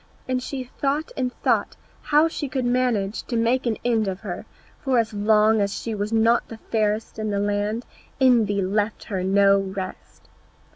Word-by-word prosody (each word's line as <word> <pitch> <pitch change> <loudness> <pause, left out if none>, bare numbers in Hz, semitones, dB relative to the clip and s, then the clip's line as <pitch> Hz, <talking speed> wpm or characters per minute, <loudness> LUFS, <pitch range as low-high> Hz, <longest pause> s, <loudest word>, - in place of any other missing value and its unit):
And 255 -1 0
she 265 0 -4
thought 280 +4 -2
and 255 -2 -1
thought - - +1 0.3
how 300 +2 +4
she 300 -3 -4
could 255 -1 -2
manage 245 -5 0
to 240 - -3
make 240 +2 +1
an 225 - 0
end 225 -3 +2
of 190 0 -4
her, 185 -5 -6 0.3
for 265 -2 +1
as 225 -2 +1
long 215 +1 +3
as 200 0 -1
she 230 - -4
was 205 +1 -3
not 225 +1 +3
the 225 - -9
fairest 220 0 -1
in 215 0 -2
the 200 - -1
land, 205 +3 -1 0.3
envy 225 -7 +3
left 205 +3 -1
her 190 -4 -3
no 200 +1 +4
rest. 190 -1 -7
220 Hz, 180 wpm, -23 LUFS, 205-250 Hz, 0.3 s, how